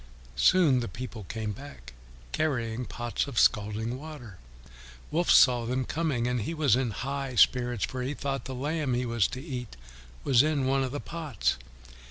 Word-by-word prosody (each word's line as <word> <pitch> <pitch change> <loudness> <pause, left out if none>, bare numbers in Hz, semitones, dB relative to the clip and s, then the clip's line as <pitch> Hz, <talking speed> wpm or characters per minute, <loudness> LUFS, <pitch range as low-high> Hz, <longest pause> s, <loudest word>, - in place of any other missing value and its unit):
Soon 155 - +5
the 120 - -3
people 115 -4 -7
came 110 +2 -4
back, 100 - -11 0.4
carrying 120 -7 -1
the 125 - -5
pots 120 +2 -3
of 135 -4 -7
scalding 110 +4 +2
water. 135 - -10 0.7
Wolf 170 +3 0
saw 125 -3 +6
them 130 +1 -1
coming, 150 -7 -1
and 125 -1 0
he 165 +10 -3
was 150 -7 +3
in 130 -1 0
high 135 +4 -4
spirits, 120 -2 +3
for 130 - -5
he 135 +4 -2
thought 135 -3 -3
the 130 - -5
lamb 145 0 -1
he 125 +1 -1
was 115 -4 +2
to 125 - -6
eat 125 - -6 0.5
was 130 -3 +5
in 150 -2 +1
one 135 +1 +2
of 130 - -3
the 145 - -3
pots. 155 - -2
125 Hz, 180 wpm, -28 LUFS, 115-140 Hz, 0.7 s, saw